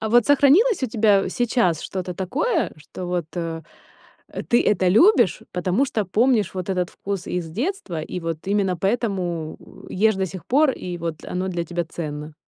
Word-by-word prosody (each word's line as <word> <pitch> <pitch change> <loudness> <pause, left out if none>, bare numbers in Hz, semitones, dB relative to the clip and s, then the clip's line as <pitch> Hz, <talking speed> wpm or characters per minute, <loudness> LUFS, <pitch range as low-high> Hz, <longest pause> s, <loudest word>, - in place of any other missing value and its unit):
А 220 - -2
вот 240 0 +4
сохранилось 290 - +4
у - - +2
тебя, 210 -4 +3
сейчас 225 - +1
что-то 185 -2 -5
такое, 305 - -1
что 175 +4 -8
вот, 175 -3 -2
э, 165 -1 -3 0.7
э, - - -6
ты 240 - +3
это 190 -3 +2
любишь, 220 - +4
потому 185 +8 +1
что 220 -6 -1
помнишь 215 0 +2
вот 185 0 -4
этот 180 -1 -1
вкус 195 -2 -5
из 175 -2 -3
детства, 225 - -3
и 175 +3 -5
вот 165 -1 -3
именно 195 -3 +1
поэтому 185 -5 -2 0.3
ешь 220 +2 +2
до 190 0 0
сих 185 0 -9
пор, 290 +2 +4
и 180 -7 -5
вот 165 -2 -5
оно 185 +1 -3
для 175 -2 -2
тебя 175 +1 -3
ценно? 150 -2 -6
190 Hz, 180 wpm, -22 LUFS, 175-230 Hz, 0.7 s, вот